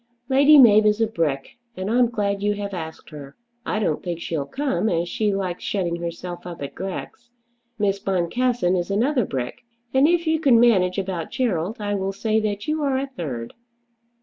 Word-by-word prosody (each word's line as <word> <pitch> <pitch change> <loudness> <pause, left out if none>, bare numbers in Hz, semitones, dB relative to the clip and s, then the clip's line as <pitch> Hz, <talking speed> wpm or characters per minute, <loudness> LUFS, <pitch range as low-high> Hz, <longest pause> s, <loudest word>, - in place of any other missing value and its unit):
Lady 280 +3 +6
Mab 215 -5 +7
is 210 +1 +2
a 225 - +4
brick, 160 - -2 0.2
and 185 +1 -3
I'm 240 +2 +3
glad 200 -3 -1
you 205 0 +1
have 200 -1 -5
asked 160 -2 -7
her. 140 -2 -10 0.3
I - - 0
don't 195 -8 0
think 175 -2 -4
she'll 155 -4 -3
come, 265 -6 -1
as 170 -1 0
she 210 +3 0
likes 190 -3 -3
shutting 175 -4 -1
herself 175 +1 -6
up 170 -4 -7
at 140 - -6
Grex. 195 +5 -7 0.5
Miss 200 -2 0
Boncassen 195 +2 0
is 175 0 -2
another 245 +4 +1
brick. 125 -5 -5 0.3
And 265 +2 +5
if 340 0 +2
you 320 0 +1
can 265 -7 +5
manage 190 -6 +4
about 185 -4 -3
Gerald 210 -4 -1
I 205 -1 -2
will 195 -1 -2
say 220 +2 0
that 205 -1 -3
you 305 0 0
are 275 -2 +1
a 270 - -1
third." 145 - -6
200 Hz, 190 wpm, -23 LUFS, 175-240 Hz, 0.5 s, Mab